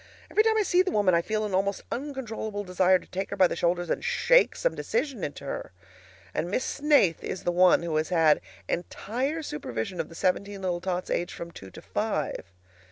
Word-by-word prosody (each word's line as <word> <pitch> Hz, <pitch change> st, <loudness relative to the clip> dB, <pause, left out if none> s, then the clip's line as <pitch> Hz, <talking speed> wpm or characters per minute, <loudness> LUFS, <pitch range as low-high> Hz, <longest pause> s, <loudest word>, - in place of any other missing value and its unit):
Every 430 Hz, -, +5 dB
time 440 Hz, 0 st, +3 dB
I 430 Hz, -, +3 dB
see 360 Hz, -1 st, +4 dB
the 375 Hz, -, 0 dB
woman 205 Hz, -3 st, +3 dB
I 170 Hz, -, +4 dB
feel 215 Hz, +4 st, -1 dB
an 205 Hz, -, -4 dB
almost 195 Hz, +1 st, 0 dB
uncontrollable 230 Hz, -6 st, -4 dB
desire 185 Hz, 0 st, +3 dB
to -, -, -15 dB
take 190 Hz, +1 st, -4 dB
her -, -, -3 dB
by 190 Hz, -, +6 dB
the -, -, 0 dB
shoulders 175 Hz, +1 st, 0 dB
and -, -, -1 dB
shake 485 Hz, +1 st, +4 dB
some -, -, 0 dB
decision 280 Hz, -, -2 dB
into 145 Hz, -1 st, -5 dB
her. 135 Hz, -, -5 dB, 0.6 s
And 170 Hz, -, -2 dB
Miss 230 Hz, +7 st, 0 dB
Snaith 280 Hz, -, +3 dB
is 185 Hz, -, -4 dB
the 175 Hz, -, +1 dB
one 180 Hz, -1 st, +5 dB
who 165 Hz, -2 st, -2 dB
has 155 Hz, -, 0 dB
had 165 Hz, -4 st, +4 dB, 0.3 s
entire 260 Hz, -, -2 dB
supervision 150 Hz, -, -4 dB
of -, -, -2 dB
the 165 Hz, -, -12 dB
seventeen 195 Hz, +3 st, -1 dB
little 175 Hz, -2 st, -1 dB
tots 180 Hz, 0 st, -3 dB
aged 175 Hz, -, -1 dB
from 170 Hz, 0 st, -7 dB
two 95 Hz, -11 st, -11 dB
to -, -, -12 dB
five! 100 Hz, -, -2 dB
190 Hz, 210 wpm, -27 LUFS, 175-265 Hz, 0.6 s, by